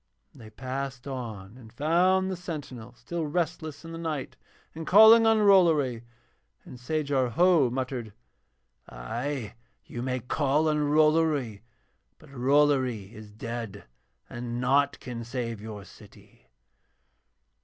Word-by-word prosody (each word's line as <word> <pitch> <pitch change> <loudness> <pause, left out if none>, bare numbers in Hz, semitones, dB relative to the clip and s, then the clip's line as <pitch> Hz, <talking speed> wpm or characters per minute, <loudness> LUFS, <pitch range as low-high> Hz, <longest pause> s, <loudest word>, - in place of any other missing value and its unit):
And 130 - -16
they 110 - -11
passed 130 +3 -6
on 115 -5 -7
and 110 -3 -14
found 180 +8 +2
the - - -2
sentinel 140 -9 -8
still 170 +2 -5
restless 160 -1 -3
in 165 - -8
the 165 - -7
night 155 -5 -4 0.4
and 160 0 -8
calling 220 +3 +8
on 220 -1 +4
Rollory. 160 - +4 0.6
And 125 - -11
Sajar 140 -1 -1
Ho 170 -4 +4
muttered: 125 -3 -4 0.8
'Ay, 120 - -5 0.3
you 120 - -7
may 130 0 -2
call 145 +5 0
on 150 - +1
Rollory, 150 -6 +2 0.6
but - - -18
Rollory 130 -5 +1
is 110 -1 -11
dead 115 -2 -7 0.4
and 120 0 -5
naught 140 +3 +2
can 120 -2 -7
save 115 -3 -5
your 105 -2 -8
city.' - - -18
135 Hz, 125 wpm, -27 LUFS, 120-155 Hz, 0.8 s, calling